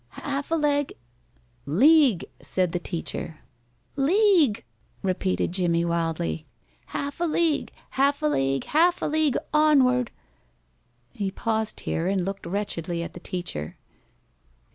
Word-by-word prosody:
"Half 280 0 -2
a 330 - +2
leg 290 -2 +1 0.4
" 120 0 -36 0.2
"League," 290 - +6
said 185 -2 0
the 175 - -1
teacher. 165 -2 -4 0.5
"League," 310 - +3 0.4
repeated 185 -1 0
Jimmie, 170 -2 +1
wildly. 165 -2 -2 0.4
"Half 285 +2 -4
a 345 - +1
league, 325 -1 +1 0.2
half 280 +2 +1
a - - +2
league, 135 - +1
half 345 +4 +2
a - - +1
league 305 -3 +2 0.2
onward." 265 -5 +4 1.0
He 200 -2 -2
paused 220 +2 -2
here 165 +2 -2
and 190 -2 0
looked 195 -2 -5
wretchedly 175 -3 -2
at - - -7
the - - -9
teacher. 175 - -5
210 Hz, 125 wpm, -25 LUFS, -, 1.0 s, League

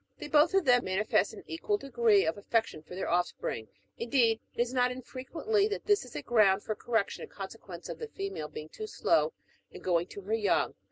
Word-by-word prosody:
They - - -7
both 300 +5 +4
of 390 -4 +3
them 245 -2 +5
manifest 190 +3 +2
an - - -11
equal 410 +5 -1
degree 235 - +3
of 160 - 0
affection 215 -4 -1
for 180 - -11
their 190 - -3
offspring; 175 -10 -1 0.3
in 235 - -4
deed, 230 -4 +4 0.2
it - - -13
is 240 +1 +1
not 250 -1 +3
unfrequently 310 - -1
that 420 - -4
this 410 -5 +3
is 250 - -13
a 145 - -4
ground 205 -4 +4
for 215 - -2
correction, 225 -1 -1
in 470 - -7
consequence - - -8
of - - -6
the 460 - -5
female 390 - -5
being 155 0 -8
too 430 - -7
slow 455 - +2 0.4
in - - -12
going 175 -1 +1
to 200 - -9
her 200 +3 -3
young. 215 -3 +2
235 Hz, 215 wpm, -30 LUFS, 195-310 Hz, 0.4 s, them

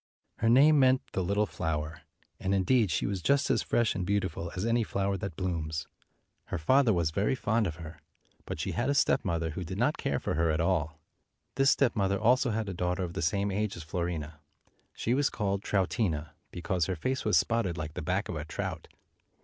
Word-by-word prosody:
Her 115 - +2
name 145 +5 +6
meant 130 -1 +4
"the 95 - 0
Little 100 +4 +1
Flower," 75 -4 -3 0.4
and 95 +1 0
in 95 - +2
deed 115 0 +3
she - - 0
was 100 -2 -2
just 140 +5 +2
as - - +2
fresh 120 -3 +1
and 95 - -3
beautiful 95 -3 -2
as 95 +3 -2
any 115 +1 +2
flower 100 -2 -1
that 95 -3 -5
blooms. 80 -4 -3 0.6
Her - - -3
father 130 - +4
was 85 -5 +1
very 100 +9 +1
fond 110 -1 +1
of 80 - -4
her, 80 -1 -10 0.4
but - - -5
she - - -2
had 120 +3 -1
a 140 - +2
stepmother 85 - +1
who 90 +5 -5
did 80 - -6
not - - +1
care - - -1
for - - -2
her 85 +1 +1
at 80 +1 +1
all. 80 -3 0 0.5
This 135 0 +3
stepmother 100 -9 +2
also 125 +3 +3
had 110 -1 -2
a 95 - -3
daughter 90 +1 -1
of 85 -1 -4
the 95 - -3
same 100 +5 0
age 105 0 -2
as 85 - -7
Fiorina. 80 -3 -4 0.6
She 115 - 0
was 140 +2 +2
called 100 -3 -1
Troutina, 95 - -1 0.2
be 90 - -8
cause 90 0 0
her 95 - -1
face 130 +10 -2
was 105 - +3
spotted 110 -7 +1
like 75 -1 -5
the - - -5
back 95 +6 -1
of 85 - -4
a 75 - -3
trout. 75 - -5
95 Hz, 215 wpm, -29 LUFS, 80-110 Hz, 0.6 s, name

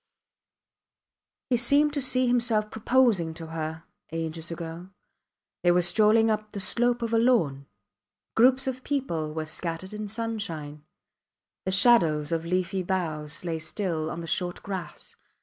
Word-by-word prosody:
He 245 - +4
seemed 285 +5 +3
to 285 - -1
see 255 0 +1
himself 230 -3 +2
proposing 220 -8 +2
to 165 0 -8
her 160 0 -4 0.3
ages 165 0 -4
ago. 170 +1 -7 0.7
They 175 - +3
were 175 0 +4
strolling 220 +4 +4
up 215 0 -2
the 200 - -4
slope 240 +4 +1
of 230 0 -2
a 225 - +4
lawn. 160 - +2 0.7
Groups 255 +3 +4
of 255 -1 -4
people 170 - -2
were 160 0 -4
scattered 165 +4 -3
in 210 0 -5
sunshine. 195 -10 -5 0.8
The 190 - 0
shadows 170 -8 +4
of 165 0 -1
leafy 185 +2 -1
boughs 165 -4 -1
lay 165 -2 -2
still 160 -2 -3
on 170 - -5
the - - -6
short 175 +1 -2
grass. 190 -4 -7
185 Hz, 145 wpm, -27 LUFS, 165-230 Hz, 0.8 s, He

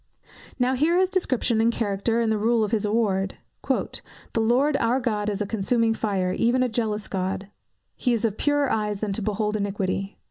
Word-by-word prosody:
Now, 250 0 +2
hear 310 +7 +2
his 375 0 +2
description 255 - +1
and 230 +1 +3
character 225 +1 0
and 225 -1 +1
the 215 - +1
rule 225 +1 +2
of 210 - -2
his 215 -2 +1
award: 205 -3 0 0.3
"The - - -1 0.4
Lord 260 +6 +3
our 240 +1 +1
God 215 -4 -1
is 205 0 -1
a - - -4
consuming 225 +2 +1
fire, 195 -5 -1
even 245 +5 +2
a 250 - 0
jealous 215 -2 -2
God." 190 +1 -3 0.5
"He 250 - 0
is 235 -1 +1
of 215 -3 0
purer 290 0 +1
eyes 210 -2 -1
than 210 -2 -1
to 220 - -3
behold 210 +1 -1
iniquity." 195 -1 -2
220 Hz, 190 wpm, -25 LUFS, 205-240 Hz, 0.5 s, and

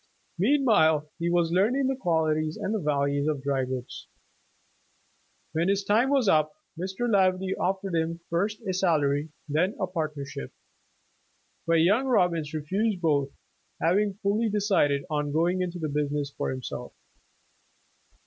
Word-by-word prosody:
Meanwhile 190 - +3
he 170 0 0
was 170 -1 +2
learning 225 +10 +2
the 265 +1 +1
qualities 155 -7 0
and 210 -3 -2
values 140 0 0
of 145 -3 -1
dry 135 -2 0
goods. 130 -1 -6 1.4
When 165 +3 0
his 200 0 +1
time 220 +6 +3
was 275 -5 +2
up, 155 -4 +3 0.2
Mr. 190 +7 -3
Laverty 190 -3 +2
offered 190 0 -2
him 165 0 -1
first 200 +6 -1
a 190 - 0
salary, 155 -5 +1 0.2
then 165 +7 +1
a - - +1
partnership, 150 -5 -5 1.2
but 165 -1 +4
young 205 +10 +3
Bobbins 170 -8 +2
refused 185 +7 -1
both, 145 -5 +1 0.5
having 195 +4 +2
fully 215 +3 +1
decided 195 -9 +1
on 150 -1 -2
going 175 +4 +1
into 180 -1 -3
the 160 -2 -3
business 145 -1 -2
for - - -2
himself. 130 -1 -6
170 Hz, 135 wpm, -27 LUFS, 150-195 Hz, 1.4 s, but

